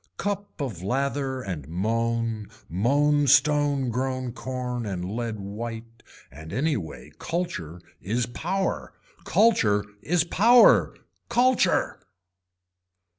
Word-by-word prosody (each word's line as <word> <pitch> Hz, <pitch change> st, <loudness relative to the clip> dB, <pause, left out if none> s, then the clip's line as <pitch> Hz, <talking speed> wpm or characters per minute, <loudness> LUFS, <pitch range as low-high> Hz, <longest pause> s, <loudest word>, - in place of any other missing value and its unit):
Cup 205 Hz, -2 st, -4 dB
of 120 Hz, -, -4 dB
lather 135 Hz, +4 st, -1 dB
and 80 Hz, -8 st, -5 dB
moan 115 Hz, +4 st, -1 dB, 0.2 s
moan 145 Hz, -, +2 dB
stone 145 Hz, -1 st, +3 dB
grown 130 Hz, +1 st, -2 dB
corn 125 Hz, -1 st, -4 dB
and 90 Hz, -3 st, -4 dB
lead 115 Hz, -1 st, -3 dB
white 115 Hz, +3 st, -7 dB, 0.3 s
and 80 Hz, +4 st, -11 dB
any 150 Hz, -, 0 dB
way 80 Hz, -, -7 dB
culture 95 Hz, -, -4 dB, 0.2 s
is 115 Hz, +6 st, -1 dB
power, 185 Hz, +10 st, -3 dB, 0.3 s
Culture 105 Hz, -, +3 dB, 0.2 s
is 175 Hz, 0 st, +1 dB
power. 230 Hz, +8 st, +5 dB, 0.3 s
Culture. 250 Hz, +1 st, +2 dB
125 Hz, 100 wpm, -25 LUFS, 105-145 Hz, 0.3 s, power